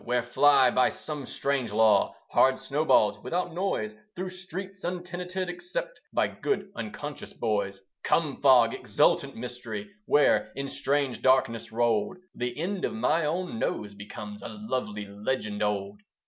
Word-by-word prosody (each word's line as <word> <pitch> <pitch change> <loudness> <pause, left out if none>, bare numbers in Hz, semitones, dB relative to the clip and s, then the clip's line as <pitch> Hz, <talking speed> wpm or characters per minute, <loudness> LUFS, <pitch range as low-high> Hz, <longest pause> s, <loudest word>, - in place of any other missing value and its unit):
where 125 0 0
fly, 135 +1 +5
by 130 - +4
some 150 -4 -5
strange 135 -5 -1
law, 105 -2 +4 0.2
Hard 130 0 +5
snowballs 150 +3 +2
without 175 0 -2
noise 195 +4 -1 0.2
Through 185 +1 -4
streets 190 +1 -7
untenanted, 180 +1 -3
except - - -5
By - - +2
good 405 - -2
unconscious 140 +7 -6
boys. 100 -3 -1 0.2
Come 150 -5 +1
fog! 125 -4 +6
exultant - - +2
mystery 125 - -6 0.2
Where, 145 - +4
in 140 +1 -3
strange 140 -2 0
darkness 130 -3 +2
rolled, 115 - +1 0.2
The 125 +1 -3
end 185 +4 -2
of - - 0
my 165 -7 +2
own 155 -6 -2
nose 105 -1 -2
becomes 105 - -8
A - - -6
lovely 125 - -3
legend 105 +1 -3
old. 100 -1 -1
140 Hz, 140 wpm, -28 LUFS, 115-180 Hz, 0.2 s, fog